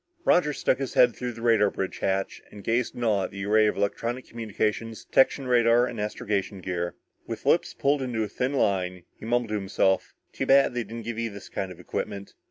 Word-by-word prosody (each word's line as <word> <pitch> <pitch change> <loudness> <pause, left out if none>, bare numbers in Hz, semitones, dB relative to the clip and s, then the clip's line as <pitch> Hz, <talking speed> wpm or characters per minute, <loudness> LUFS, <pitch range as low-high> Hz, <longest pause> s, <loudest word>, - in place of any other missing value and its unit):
Roger 160 -4 +4
stuck 135 - 0
his 135 -2 -4
head 125 -2 +5
through 125 -1 -4
the 115 0 -10
radar 110 -3 +4
bridge 95 -1 -4
hatch 95 0 -1
and 105 -1 -12
gazed 115 +3 0
in 120 - -4
awe 105 -4 +2
at - - -6
the 100 0 -6
array 110 +1 +4
of 105 - -1
electronic 115 +5 -2
communicators, 115 0 -3
detection 135 +1 +3
radar 120 -1 +4
and 115 -4 -5
astrogation 105 -1 -2
gear. 90 -2 -3 0.3
With - - -6
lips - - +2
pulled 140 0 +1
into 120 -4 -1
a - - -2
thin 125 +6 -2
line, 90 -7 0
he - - -12
mumbled 120 0 0
to - - -3
himself: 95 -1 0 0.2
"Too - - -3
bad 135 -1 +5
they 120 -1 -1
didn't 115 +2 -8
give 115 -1 -4
you 115 -1 -1
this 100 -1 -10
kind 95 -1 -4
of 90 - -11
equipment." 100 +2 -5
110 Hz, 215 wpm, -26 LUFS, 100-120 Hz, 0.3 s, head